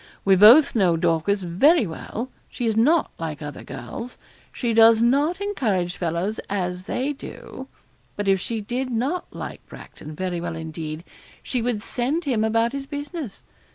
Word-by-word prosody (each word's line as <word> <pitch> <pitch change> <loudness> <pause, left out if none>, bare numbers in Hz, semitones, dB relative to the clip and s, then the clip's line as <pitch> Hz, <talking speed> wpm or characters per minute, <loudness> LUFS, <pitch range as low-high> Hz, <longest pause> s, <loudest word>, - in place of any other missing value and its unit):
We 195 -1 +6
both 230 +10 +8
know 185 -7 +3
Dorcas 175 +4 +1
very 235 - +4
well; 225 +8 -6 0.2
she 245 - -4
is 220 -2 +1
not 290 +9 +3
like 160 -3 -4
other 145 -2 -7
girls. 135 - -8 0.3
She 235 -3 -2
does 225 0 +7
not 285 +10 +2
encourage 215 - -1
fellows 175 +5 -2
as 180 -2 -2
they 270 +7 -1
do; 275 - -10 0.5
but 205 -1 -3
if 195 -1 +4
she 225 +3 -3
did 250 +5 -3
not 260 +9 -1
like - - -7
Bracton 155 0 -11
very 180 0 -3
well 170 -1 -4
indeed, 160 0 -6 0.4
she 250 - -2
would 230 -3 -1
send 275 +10 -1
him 240 -6 +1
about 225 +1 +2
his 275 0 -5
business. 290 - -6
220 Hz, 160 wpm, -23 LUFS, 175-260 Hz, 0.5 s, both